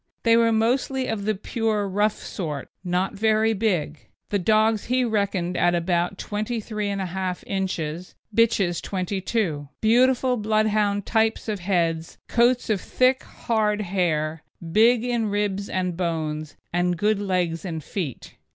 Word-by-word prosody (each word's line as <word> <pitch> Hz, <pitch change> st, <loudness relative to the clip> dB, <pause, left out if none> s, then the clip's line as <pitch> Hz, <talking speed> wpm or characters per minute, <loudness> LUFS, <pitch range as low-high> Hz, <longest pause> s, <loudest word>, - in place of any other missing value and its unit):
They 230 Hz, -1 st, +5 dB
were 230 Hz, 0 st, +4 dB
mostly 255 Hz, +4 st, +1 dB
of 215 Hz, -4 st, -3 dB
the 215 Hz, 0 st, +1 dB
pure 215 Hz, 0 st, -1 dB
rough 205 Hz, +2 st, +1 dB
sort, 150 Hz, -7 st, -5 dB
not 180 Hz, +1 st, 0 dB
very 220 Hz, +1 st, +2 dB
big; 180 Hz, -8 st, -1 dB, 0.2 s
the 205 Hz, -, +1 dB
dogs 215 Hz, +2 st, +2 dB
he 250 Hz, +1 st, +1 dB
reckoned 200 Hz, -5 st, -1 dB
at 175 Hz, 0 st, +3 dB
about 175 Hz, +2 st, 0 dB
23 215 Hz, 0 st, -3 dB
1/2 190 Hz, -2 st, -3 dB
inches, 180 Hz, -3 st, -3 dB, 0.2 s
bitches 200 Hz, -7 st, +2 dB
22: 185 Hz, -5 st, -2 dB
beautiful 250 Hz, +3 st, +3 dB
Bloodhound 215 Hz, -2 st, +1 dB
type 225 Hz, 0 st, +2 dB
of 210 Hz, -2 st, -2 dB
heads, 170 Hz, -3 st, -1 dB
coats 240 Hz, 0 st, +2 dB
of 200 Hz, -, 0 dB
thick, 255 Hz, +1 st, +2 dB
hard 215 Hz, -2 st, -1 dB
hair, 165 Hz, -5 st, -1 dB, 0.3 s
big 230 Hz, +4 st, +5 dB
in 240 Hz, -3 st, 0 dB
ribs 205 Hz, -1 st, -1 dB
and 180 Hz, -2 st, -1 dB
bones, 155 Hz, -3 st, -3 dB, 0.2 s
and 175 Hz, 0 st, +1 dB
good 210 Hz, +3 st, +1 dB
legs 180 Hz, -4 st, -1 dB
and 160 Hz, -5 st, -5 dB
feet. 155 Hz, -, -5 dB
200 Hz, 135 wpm, -24 LUFS, 175-220 Hz, 0.3 s, They